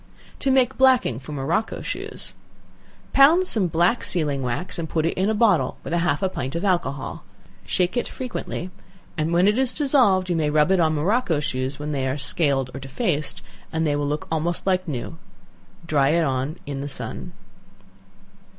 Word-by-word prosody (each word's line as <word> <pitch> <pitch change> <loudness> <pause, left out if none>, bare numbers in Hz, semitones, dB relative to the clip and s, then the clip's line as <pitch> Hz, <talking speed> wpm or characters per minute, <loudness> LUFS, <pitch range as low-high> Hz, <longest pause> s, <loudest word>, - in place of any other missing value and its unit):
To 275 - 0
Make 260 -1 +2
Blacking 255 - +4
for 135 +3 -10
Morocco 150 +9 -2
Shoes. - - -5 0.8
Pound 315 +7 +6
some 215 - +4
black 175 +8 +2
sealing 150 -6 0
wax, 125 +9 -3
and 160 -2 -4
put 160 -1 0
in 185 +4 0
a 220 - +1
bottle 220 -1 +2
with - - -5
half 175 0 +1
a - - +3
pint 145 -6 -4
of 170 +4 -2
alcohol; 170 -8 -1 0.4
shake 180 - 0
it 245 - 0
frequently, 240 -7 -5 0.4
and 155 0 -1
when 175 +3 +4
it 210 +4 +3
is 265 -1 +1
dissolved, 250 -11 +3
you 175 - 0
may 155 -2 +1
rub 150 +3 +3
it 190 - +3
on 160 -2 +2
morocco 175 +1 +1
shoes 130 -1 -3
when 150 +1 -4
they 135 -2 -1
are 130 +2 -1
scaled 140 -4 +1
or 135 - -6
defaced, 145 - -2 0.3
and 160 0 0
they 145 -1 +1
will 145 0 -1
look 150 +1 -3
almost 165 +2 -1
like 185 -1 +1
new; 155 +3 -5 0.7
dry 145 -4 +2
it 165 +2 +3
on 135 +3 -1
in 140 -1 -4
the 145 - -4
sun. - - -7
165 Hz, 180 wpm, -23 LUFS, 145-190 Hz, 0.8 s, Pound